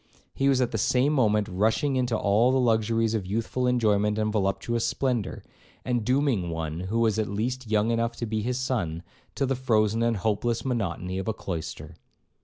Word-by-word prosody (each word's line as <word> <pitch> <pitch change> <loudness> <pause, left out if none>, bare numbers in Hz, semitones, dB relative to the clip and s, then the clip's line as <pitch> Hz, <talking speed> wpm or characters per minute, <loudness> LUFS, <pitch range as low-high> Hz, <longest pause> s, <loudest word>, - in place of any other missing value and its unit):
He 135 0 +1
was 130 -2 +3
at 125 - 0
the - - -2
same 130 +4 +2
moment 105 -6 +2
rushing 110 +8 +1
into 125 -3 +1
all 105 +5 +3
the 130 - +2
luxuries 115 -1 +2
of 105 -5 -2
youthful 115 +5 -1
enjoyment 105 -4 +2
and 110 -1 0
voluptuous 110 +3 0
splendour, 120 -4 -1 0.4
and 120 -3 0
dooming 125 -7 +1
one, 80 -1 -4
who 100 +6 -1
was 110 -1 +2
at 110 - 0
least 120 +4 -3
young 110 +1 +2
enough 115 0 0
to 120 - -4
be 110 -1 -2
his 125 +3 -1
son, 95 -11 -2 0.3
to 135 - 0
the 135 - 0
frozen 115 -3 +1
and 115 -1 +1
hopeless 110 +4 -1
monotony 95 -6 -2
of 95 - -5
a 110 - 0
cloister. 85 -4 -6
115 Hz, 190 wpm, -26 LUFS, 105-125 Hz, 0.4 s, was